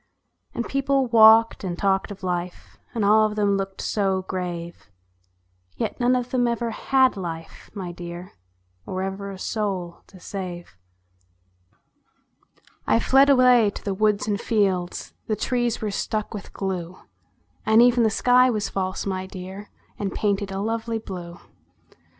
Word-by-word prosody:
And 235 - -2
people 275 0 +1
walked 225 -1 +6
and 175 -2 -3
talked 195 0 +1
of 200 -1 -10
life, 180 -1 -4 0.2
And 220 -3 +1
all 215 +1 +5
of 210 - -6
them 205 -2 +2
looked 195 0 -4
so 190 -3 0
grave; 175 - -6 0.9
Yet - - -3
none 245 +1 +3
of 250 0 -2
them 245 -2 +2
ever 235 0 -1
had 260 +3 +2
life, 165 -4 -7
my 185 -3 -5
dear, 175 +1 -8 0.6
Or 185 0 -3
ever 195 +1 -4
a 195 - -7
soul 190 -5 -3
to 190 - -16
save. 175 - -7 2.1
I 115 - +4
fled 270 - +5
away 250 -5 +6
to - - -9
the 200 - -1
woods 210 +1 +1
and 205 -1 -1
fields; 190 -6 -1
The 215 - 0
trees 240 +1 -1
were 210 - -1
stuck 215 +2 -3
with 205 -2 -8
glue; 185 -2 -4 0.7
And 220 +1 +4
even 245 0 +4
the 225 - +4
sky 250 +3 +4
was 215 -4 -1
false, 185 -1 -3
my 190 -1 -3
dear, 190 +2 -9 0.3
And 200 -2 -2
painted 200 -1 -1
a 195 0 -3
lovely 225 +1 -2
blue. 180 -5 -8
200 Hz, 150 wpm, -24 LUFS, 185-225 Hz, 2.1 s, walked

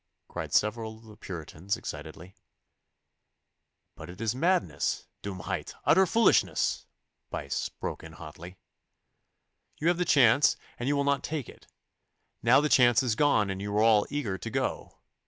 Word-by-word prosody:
cried - - -6
several 110 +1 0
of 110 - -19
the 110 -1 -14
Puritans 90 -1 -5
excitedly. 80 +5 -8 1.6
'But 75 - -11
it 90 - -11
is 115 0 -1
madness 175 +7 0 0.2
dummheit 95 -3 -5
utter 190 +4 +5
foolishness,' 225 +3 +2 0.4
Buyse - - -3
broke - - -6
in 80 -1 -11
hotly. 85 +3 -11 1.2
'You 160 - +1
have 175 0 +1
the - - +3
chance 140 -3 +4 0.2
and 120 - -3
you 145 - +2
will 140 - +1
not 140 0 +1
take 150 -6 -4
it. - - -15 0.7
Now 120 +4 +5
the 150 - +1
chance 125 -2 +5
is 120 -4 +1
gone 110 -6 +2
and 95 0 -5
you 100 +1 -3
are 105 - +4
all 110 -2 +4
eager 115 -10 -3
to - - -5
go. - - -3
110 Hz, 155 wpm, -28 LUFS, 95-140 Hz, 1.6 s, utter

